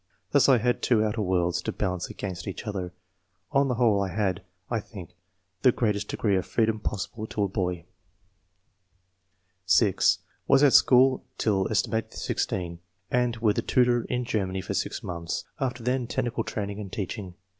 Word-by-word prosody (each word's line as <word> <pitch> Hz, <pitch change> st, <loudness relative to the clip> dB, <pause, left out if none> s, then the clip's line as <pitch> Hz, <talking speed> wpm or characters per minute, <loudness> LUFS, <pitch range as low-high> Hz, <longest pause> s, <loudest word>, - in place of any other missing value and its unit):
Thus 145 Hz, -1 st, +5 dB
I 130 Hz, -, +7 dB
had 120 Hz, +2 st, 0 dB
two 110 Hz, -4 st, +3 dB
outer 110 Hz, +1 st, -1 dB
worlds 90 Hz, -3 st, +1 dB
to -, -, -3 dB
balance 90 Hz, -1 st, -2 dB
against 95 Hz, -2 st, -6 dB
each 95 Hz, -, -5 dB
other. 95 Hz, -4 st, -4 dB, 0.6 s
On 140 Hz, 0 st, +3 dB
the 125 Hz, -, 0 dB
whole, 110 Hz, -4 st, +3 dB
I 100 Hz, -, 0 dB
had, 95 Hz, 0 st, -1 dB, 0.3 s
I 115 Hz, -, -1 dB
think, 95 Hz, -5 st, -10 dB, 0.5 s
the 125 Hz, -, +6 dB
greatest 105 Hz, -4 st, -1 dB
degree 100 Hz, -3 st, 0 dB
of 95 Hz, -, -3 dB
freedom 110 Hz, -1 st, +1 dB
possible 105 Hz, +2 st, -4 dB
to 105 Hz, -, -2 dB
a -, -, +2 dB
boy." 90 Hz, -3 st, -2 dB, 1.8 s
(6) 95 Hz, -1 st, +4 dB, 0.3 s
"Was 135 Hz, +1 st, +5 dB
at 140 Hz, -, +6 dB
school 130 Hz, +1 st, +5 dB
till 100 Hz, -3 st, +1 dB
set. 110 Hz, +2 st, -1 dB
16, 85 Hz, -2 st, -2 dB, 0.3 s
and 125 Hz, -1 st, +1 dB
with 110 Hz, -2 st, +2 dB
a -, -, +1 dB
tutor 120 Hz, -2 st, +2 dB
in 125 Hz, 0 st, -2 dB
• -, -, -15 dB
Germany 95 Hz, -4 st, -1 dB
^for -, -, -3 dB
6 -, -, -2 dB
months; 85 Hz, -2 st, -4 dB, 0.2 s
after 125 Hz, -3 st, -2 dB
then, 125 Hz, 0 st, 0 dB
technical 120 Hz, -2 st, -1 dB
training 100 Hz, -1 st, -4 dB
and 100 Hz, -3 st, -7 dB
teaching. 95 Hz, -2 st, -5 dB
105 Hz, 170 wpm, -27 LUFS, 95-120 Hz, 1.8 s, I